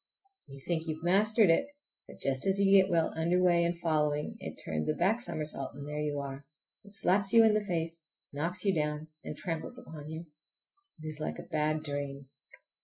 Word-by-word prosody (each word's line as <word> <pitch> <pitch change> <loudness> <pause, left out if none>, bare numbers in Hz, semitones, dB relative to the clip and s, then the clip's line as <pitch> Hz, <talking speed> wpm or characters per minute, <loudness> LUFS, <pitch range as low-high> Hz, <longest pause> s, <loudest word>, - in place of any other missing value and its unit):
You 140 0 -11
think 165 +2 -2
you 155 - -1
have 160 - -14
mastered 205 +2 +4
it, 165 - +2 0.4
but - - -12
just 135 +4 +1
as 190 0 +3
you 195 -1 +4
get 190 - -1
well 165 -3 +2
under 170 +3 +2
way 175 -2 +4
in 170 +1 +1
following, 150 -3 0
it - - -7
turns 75 -1 -2
a 155 - +1
back 205 +7 +2
somersault 150 - -3
and 140 0 -7
there 150 0 -4
you 145 -1 -1
are. 140 0 -6 0.4
It 200 0 -12
slaps 195 -1 +2
you 230 -1 +8
in 220 -1 +5
the 215 0 +1
face, 165 -4 -2 0.3
knocks 165 +8 -2
you 195 - +4
down, 150 -1 -2
and - - -6
tramples 170 +7 -4
upon 155 -10 -9
you. 160 +2 -6 0.8
It - - -8
is 155 -1 -4
like 155 - -3
a - - -7
bad 155 0 0
dream. 140 -2 -5
160 Hz, 205 wpm, -31 LUFS, 150-185 Hz, 0.8 s, you